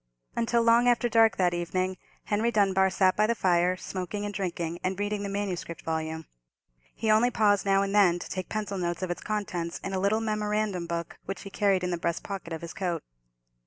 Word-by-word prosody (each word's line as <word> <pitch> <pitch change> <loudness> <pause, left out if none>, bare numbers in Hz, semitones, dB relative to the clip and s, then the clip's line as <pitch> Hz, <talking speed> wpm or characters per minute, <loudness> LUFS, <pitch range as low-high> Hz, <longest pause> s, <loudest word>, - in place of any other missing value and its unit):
Until 235 0 +2
long 235 +1 +5
after 240 0 +3
dark 225 -3 +4
that 180 -2 +2
evening, 185 +2 -1 0.3
Henry 215 +3 +1
Dunbar 195 -3 +3
sat 185 0 +3
by 215 +1 +3
the 235 - +1
fire, 180 -2 +2
smoking 190 +3 -4
and 205 - -4
drinking, 175 -3 -3
and 185 +1 -1
reading 205 0 -1
the 200 - -3
manuscript 195 -4 -4
volume. 160 0 -3 0.7
He 220 -1 +1
only 220 +3 +5
paused 205 -4 +2
now 195 0 +4
and 195 0 -2
then 190 -4 +5
to - - -7
take 185 -1 -5
pencil 205 -2 -3
notes 175 0 -2
of 180 - -2
its 175 - -4
contents 185 -5 -3
in 195 - -4
a 190 - 0
little 200 +3 +2
memorandum 210 -4 -1
book, 170 -1 -4
which 195 -2 -5
he 195 - -9
carried 195 -3 +2
in 180 - -1
the 175 - -2
breast 170 0 -2
pocket 195 -4 -6
of 160 - -4
his 170 0 -7
coat. 175 -4 -2
195 Hz, 210 wpm, -28 LUFS, 175-210 Hz, 0.7 s, long